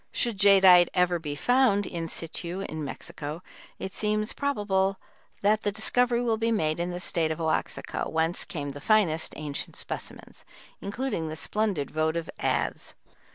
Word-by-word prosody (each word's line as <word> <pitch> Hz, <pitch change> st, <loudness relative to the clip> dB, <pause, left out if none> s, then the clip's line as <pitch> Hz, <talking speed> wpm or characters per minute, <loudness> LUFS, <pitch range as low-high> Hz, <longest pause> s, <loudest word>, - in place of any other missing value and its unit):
Should 230 Hz, -5 st, -1 dB
jadeite 190 Hz, -3 st, +7 dB
ever 180 Hz, -1 st, +3 dB
be 150 Hz, -3 st, -4 dB
found 245 Hz, -, +3 dB
in 165 Hz, -2 st, -4 dB
situ 170 Hz, +3 st, -3 dB
in 155 Hz, -5 st, -5 dB
Mexico, 150 Hz, +3 st, -6 dB, 0.3 s
it 190 Hz, -, -6 dB
seems 215 Hz, 0 st, -1 dB
probable 195 Hz, -8 st, 0 dB, 0.4 s
that 210 Hz, +1 st, +3 dB
the 205 Hz, -, 0 dB
discovery 240 Hz, +3 st, +1 dB
will 230 Hz, -2 st, +1 dB
be 230 Hz, +1 st, 0 dB
made 155 Hz, -7 st, 0 dB
in 175 Hz, +1 st, -1 dB
the 175 Hz, 0 st, -4 dB
State 165 Hz, -3 st, 0 dB
of 160 Hz, -, -3 dB
Oaxaca, 160 Hz, -1 st, -2 dB
whence 160 Hz, +2 st, 0 dB
came 145 Hz, -4 st, -5 dB
the 140 Hz, +1 st, -8 dB
finest 195 Hz, -8 st, +2 dB
ancient 150 Hz, -2 st, -5 dB
specimens, -, -, -8 dB, 0.4 s
including 200 Hz, -5 st, -2 dB
the 155 Hz, -, -5 dB
splendid 200 Hz, -4 st, -1 dB
votive 160 Hz, +1 st, -1 dB
adze. -, -, -1 dB
180 Hz, 155 wpm, -27 LUFS, 160-215 Hz, 0.4 s, jadeite